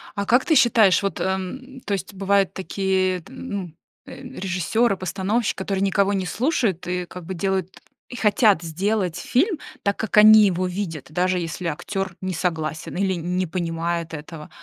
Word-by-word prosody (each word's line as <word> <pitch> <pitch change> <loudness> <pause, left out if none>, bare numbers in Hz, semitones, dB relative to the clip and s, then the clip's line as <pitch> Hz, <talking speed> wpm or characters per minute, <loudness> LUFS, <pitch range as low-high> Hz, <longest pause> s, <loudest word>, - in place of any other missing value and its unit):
А 200 -1 -2
как 245 +4 +4
ты 320 - +3
считаешь, 230 -8 +5
вот, 195 -5 -2
эм, 255 +8 -4
то 205 - -3
есть 195 +1 -5
бывают 195 0 +2
такие 190 -1 0
т 160 - -16
ну, 200 -9 -6 0.3
э, - - -10
режиссёры, 195 +4 0
постановщики, 195 +5 -1
которые 195 0 -2
никого 200 +1 +2
не 190 -2 -1
слушают 225 - 0
и 180 0 -2
как 180 0 -10
бы 190 +2 -5
делают 190 0 -2 0.3
и 245 - -8
хотят 210 -4 +3
сделать 180 +2 -1
фильм 330 - +1 0.2
так, 200 0 0
как 220 - -2
они 215 0 +9
его 185 -1 0
видят, 180 -6 -4
даже 180 +3 +1
если 170 +1 -4
актёр 190 +3 -3
не 185 - -2
согласен 160 -3 -3
или 190 0 +1
не 180 +2 -2
понимает 165 0 -3
этого. 150 0 -8
190 Hz, 170 wpm, -23 LUFS, 175-205 Hz, 0.3 s, они